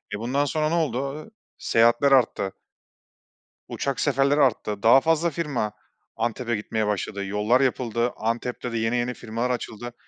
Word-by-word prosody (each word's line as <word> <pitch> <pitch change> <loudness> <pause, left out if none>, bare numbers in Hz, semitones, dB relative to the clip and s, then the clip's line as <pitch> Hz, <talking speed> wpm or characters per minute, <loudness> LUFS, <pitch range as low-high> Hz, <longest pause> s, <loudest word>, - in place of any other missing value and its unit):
E, - - -6
bundan 130 +5 0
sonra 155 +1 0
ne 165 - 0
oldu? 140 -3 -1
Iıı, 220 - -15 0.3
seyahatler 120 +5 +3
arttı. 115 -7 +2 1.1
Uçak 140 -1 -3
seferleri 140 +1 +2
arttı. 105 -5 0
Daha 120 +4 +7
fazla 165 +2 +2
firma 140 -10 -2 0.4
Antep'e 115 +1 -2
gitmeye 110 0 -2
başladı. 100 0 -2
Yollar 105 +6 +2
yapıldı, 120 -2 0
Antep'te 120 +2 -3
de 115 - -2
yeni 115 +2 0
yeni 120 +1 -1
firmalar 115 +1 -3
açıldı. 120 -1 -4
120 Hz, 150 wpm, -24 LUFS, 115-140 Hz, 1.1 s, Daha